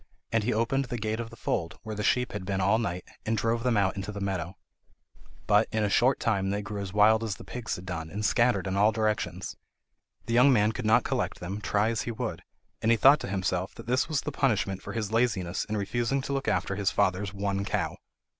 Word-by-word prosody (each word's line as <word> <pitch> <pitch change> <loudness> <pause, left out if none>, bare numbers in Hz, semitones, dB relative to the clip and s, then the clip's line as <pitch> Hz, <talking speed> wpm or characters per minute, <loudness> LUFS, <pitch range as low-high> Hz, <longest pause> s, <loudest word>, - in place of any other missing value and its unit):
And 115 -1 +2
he 120 - 0
opened 120 +5 +1
the 120 -1 -4
gate 110 0 -2
of 115 -1 -4
the - - -12
fold, 85 +2 -2
where 110 -1 -5
the 105 - -4
sheep 125 +3 +1
had 105 -2 -5
been 95 0 -2
all 100 +4 +3
night, 90 -5 -2 0.2
and 110 +1 0
drove 115 +1 0
them 120 -2 +1
out 95 -2 +2
into 100 +1 -4
the 100 - -6
meadow. 95 -2 -3 0.9
But - - +4
in 110 -1 0
a 105 - 0
short 130 +5 +3
time 95 -4 0
they 100 +1 -1
grew 100 0 -5
as 95 -2 -5
wild 110 +2 +4
as 110 -3 -2
the - - -11
pigs 125 -3 -4
had 90 - -9
done, 80 -3 -5
and 105 +4 -3
scattered 120 -2 +2
in 95 0 -2
all 105 +2 +4
directions. 105 -5 -2 0.7
The 115 - -2
young 125 +4 +6
man 105 -3 +4
could 115 -1 -4
not 115 +2 +5
collect - - -2
them, 95 +4 -5
try 105 +1 +1
as 115 -2 -1
he 120 - -3
would, 110 - -4 0.4
and 110 - +1
he 115 - +5
thought 140 +6 +7
to - - -5
himself 95 -1 -1
that 115 - -10
this 125 +5 +1
was 150 -3 0
the - - -4
punishment 105 -7 0
for - - -7
his 110 -3 -3
laziness 105 -7 0
in 110 - -3
refusing 120 +6 -1
to 140 - -3
look 135 -3 -2
after 105 -2 0
his 100 -1 +1
father's 100 -1 0
one 100 0 -2
cow. - - -1
105 Hz, 240 wpm, -28 LUFS, 100-115 Hz, 0.9 s, thought